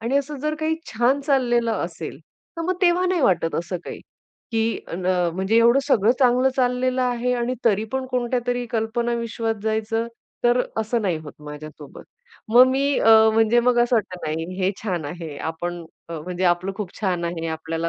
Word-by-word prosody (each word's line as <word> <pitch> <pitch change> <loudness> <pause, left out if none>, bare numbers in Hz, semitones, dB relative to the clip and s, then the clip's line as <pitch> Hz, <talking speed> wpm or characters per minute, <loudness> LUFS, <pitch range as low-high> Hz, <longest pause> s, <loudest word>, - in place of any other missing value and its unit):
आणि 240 +5 0
असं 285 +1 -4
जर 305 +1 -1
काही 315 +1 +1 0.2
छान 245 +5 +2
चाललेलं 240 -5 +1
असेल. 165 -4 -7 0.4
तर 330 - -3
मग 370 +2 0
तेव्हा 360 +1 +3
नाही 360 -3 +1
वाटत 170 -8 +2
असं 175 +2 -2
काही, - - -7 0.5
की 225 0 0
न 180 +1 -4
अ, 180 -2 +2
म्हणजे 190 +4 +1
एवढं 235 +3 +5
सगळं 230 -4 +4
चांगलं 255 0 +4
चाललेलं 255 0 +1
आहे 250 0 0
आणि 245 +1 -1
तरीपण 225 +4 0
कोणत्यातरी 245 0 -1
कल्पना 235 +1 -1
विश्वात 230 -1 -2
जायचं, 220 +1 -1 0.4
तर 240 +1 +4 0.2
असं 225 +1 -1
नाही 180 -4 0
होत 145 - -9
माझ्यासोबत. 150 0 -10 0.5
मग 245 +3 +7
मी 280 +1 +1
अ, 225 - +4 0.2
म्हणजे 225 +2 +4
मग 245 0 +2
असं 240 0 +2
वाटतं, 185 -4 -2
नाही 165 +4 -3
हे 185 +1 +2
छान 180 -7 -2
आहे. 160 -1 -6
आपण 170 +1 -4 0.2
अ, 170 - -7
म्हणजे 180 +3 -4
आपलं 175 +2 +1
खूप 205 -5 -6
छान 180 -4 -1
आहे. 170 -1 -3
आपल्याला 160 +1 -3
225 Hz, 180 wpm, -23 LUFS, 175-250 Hz, 0.5 s, मग